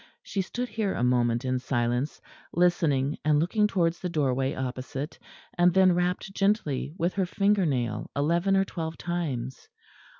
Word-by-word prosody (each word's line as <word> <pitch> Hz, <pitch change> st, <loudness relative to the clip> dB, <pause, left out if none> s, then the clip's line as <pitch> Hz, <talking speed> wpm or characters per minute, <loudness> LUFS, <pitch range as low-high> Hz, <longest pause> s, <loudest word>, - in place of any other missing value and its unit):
She 195 Hz, -, -2 dB
stood 245 Hz, +6 st, -4 dB
here 210 Hz, -3 st, -1 dB
a -, -, -1 dB
moment 120 Hz, 0 st, +2 dB
in 130 Hz, 0 st, 0 dB
silence, 125 Hz, +2 st, -1 dB, 0.3 s
listening 155 Hz, -5 st, +2 dB
and 150 Hz, -1 st, +3 dB
looking 210 Hz, +6 st, +2 dB
towards 170 Hz, -4 st, 0 dB
the 180 Hz, -, -3 dB
doorway 135 Hz, -4 st, 0 dB
opposite, 130 Hz, +3 st, -5 dB, 0.4 s
and 175 Hz, 0 st, +5 dB
then 190 Hz, -1 st, +6 dB
rapped 180 Hz, +2 st, -1 dB
gently 195 Hz, -10 st, 0 dB
with 170 Hz, +2 st, 0 dB
her 195 Hz, -2 st, 0 dB
finger 200 Hz, -1 st, +2 dB
nail 120 Hz, -6 st, -2 dB
eleven 170 Hz, +7 st, +2 dB
or 195 Hz, -, +3 dB
twelve 160 Hz, -3 st, -5 dB
times. 140 Hz, -8 st, -4 dB
165 Hz, 155 wpm, -27 LUFS, 130-185 Hz, 0.4 s, then